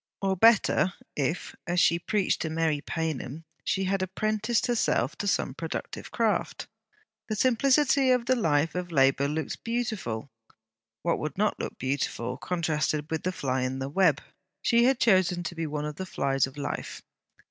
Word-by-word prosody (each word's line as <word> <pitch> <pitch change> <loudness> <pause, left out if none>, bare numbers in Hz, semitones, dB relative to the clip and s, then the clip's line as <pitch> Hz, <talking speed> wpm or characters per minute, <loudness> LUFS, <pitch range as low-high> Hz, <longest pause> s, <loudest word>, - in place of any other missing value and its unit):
Or 195 -1 0
better, 195 -3 +4 0.2
if, 150 +5 -2
as 175 +1 +1
she 170 0 +4
preached 200 +2 0
to 160 - -1
Mary 160 -2 0
Paynham, 160 -2 -4 0.2
she 195 - 0
had 190 0 0
apprenticed 215 +4 0
herself 225 - +1
to 205 - -2
some 160 - 0
productive 165 +3 -5
craft. 225 -3 0 0.6
The 215 - -1
simplicity 265 +3 +3
of 250 -2 +3
the 255 +1 +3
life 160 - +1
of 180 -1 -4
labour 135 -1 +3
looked 150 0 -4
beautiful. 215 - -3 0.7
What 170 - +1
will 155 -2 -3
not 210 +1 +1
look - - -5
beautiful 130 -2 -2
contrasted 155 -3 -1
with 160 -1 -1
the 185 - -1
fly 130 -7 -1
in 130 +1 -2
the 135 0 -3
web? 160 -2 +3 0.4
She 235 0 +4
had 260 0 +3
chosen 185 -5 +3
to 175 - -4
be 165 -1 -3
one 150 0 -3
of 150 0 -5
the 190 - -5
flies 135 -5 +1
of 135 +2 -13
life. 145 0 -5
170 Hz, 170 wpm, -27 LUFS, 145-210 Hz, 0.7 s, better